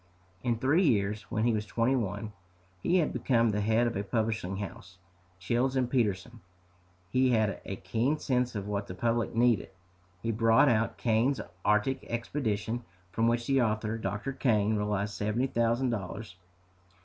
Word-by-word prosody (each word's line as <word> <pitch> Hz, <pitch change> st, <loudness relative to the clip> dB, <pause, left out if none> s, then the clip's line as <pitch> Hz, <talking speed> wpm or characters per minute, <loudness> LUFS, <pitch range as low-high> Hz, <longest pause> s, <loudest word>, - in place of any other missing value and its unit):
In 120 Hz, -2 st, 0 dB
three 140 Hz, +9 st, +3 dB
years, 105 Hz, -2 st, 0 dB
when 110 Hz, -2 st, -1 dB
he 120 Hz, 0 st, +3 dB
was 105 Hz, -1 st, -2 dB
twenty 115 Hz, +5 st, +1 dB
one, 110 Hz, -2 st, -3 dB, 0.5 s
he 175 Hz, -, +2 dB
had 165 Hz, -, +1 dB
become 115 Hz, -3 st, +2 dB
the 105 Hz, 0 st, -1 dB
head 110 Hz, +3 st, +2 dB
of 120 Hz, -, -1 dB
a 100 Hz, -, -1 dB
publishing 110 Hz, -2 st, -1 dB
house, 100 Hz, -3 st, -8 dB, 0.4 s
Childs 125 Hz, +7 st, 0 dB
& -, -, -14 dB
Peterson. 120 Hz, -1 st, 0 dB, 0.7 s
He 130 Hz, +2 st, +3 dB
had 110 Hz, -4 st, +1 dB
a 95 Hz, -, -4 dB
keen 115 Hz, -, 0 dB
sense 125 Hz, -5 st, 0 dB
of 100 Hz, -1 st, -4 dB
what 100 Hz, -1 st, -2 dB
the 90 Hz, -, -7 dB
public 115 Hz, +3 st, 0 dB
needed. 120 Hz, -4 st, +3 dB, 0.5 s
He 115 Hz, -, 0 dB
brought 115 Hz, +4 st, +4 dB
out 115 Hz, -1 st, +1 dB
Kane's 120 Hz, +4 st, +1 dB, 0.2 s
"Arctic 105 Hz, +6 st, +1 dB
Expedition," 120 Hz, -1 st, -2 dB, 0.3 s
from 115 Hz, +5 st, +1 dB
which 120 Hz, 0 st, +1 dB
the 135 Hz, 0 st, +3 dB
author, 110 Hz, 0 st, -1 dB
Dr. 110 Hz, +5 st, -3 dB
Kane, 110 Hz, -5 st, +2 dB
realized 105 Hz, 0 st, -1 dB
seventy 105 Hz, +6 st, 0 dB
thousand 120 Hz, 0 st, +1 dB
dollars. 105 Hz, -1 st, -5 dB
115 Hz, 160 wpm, -29 LUFS, 105-120 Hz, 0.7 s, brought